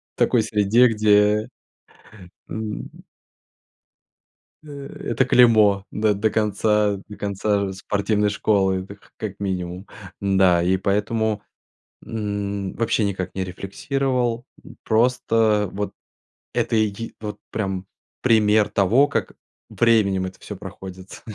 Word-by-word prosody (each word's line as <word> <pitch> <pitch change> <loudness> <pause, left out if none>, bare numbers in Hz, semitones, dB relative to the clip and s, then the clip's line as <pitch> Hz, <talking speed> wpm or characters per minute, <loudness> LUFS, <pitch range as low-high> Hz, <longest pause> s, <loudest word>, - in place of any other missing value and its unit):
в - - -22
такой 115 -3 +3
среде, 110 +3 +4
где, 105 -1 +3 1.0
э - - -7 2.1
э, 155 - -13 0.4
это 120 +3 +2
клеймо 110 -6 +5
до 105 -1 +1
до 105 +2 0
конца 105 -1 +1
до 105 - -9
конца, 100 0 -1
э, 95 - -5
спортивной 105 +2 0
школы, 95 -2 +1
это 100 +2 -11
к - - -25
как 100 -3 -6
минимум. 90 -1 -4 0.3
Да, 95 -3 +3
и 95 +2 +2
поэтому, 105 +2 0 0.6
м, 100 -3 -3
вообще 115 -1 0
никак 95 -2 -3
не 95 -1 -2
рефлексировал. 120 +5 -2 0.2
Э, - - -12 0.2
просто, 120 +2 +1 0.4
э, - - -16
вот 105 +1 -3 0.6
это - - 0
и 110 0 +4
е 105 +3 -6
вот 105 -1 -6
прям 95 -3 -3 0.4
пример 110 -3 +4
того, 115 +9 +3
как - - -2 0.4
временем 100 -5 +2
это 95 - -8
всё 105 - -8
проходится. 95 -1 -10
105 Hz, 125 wpm, -22 LUFS, 100-110 Hz, 2.1 s, клеймо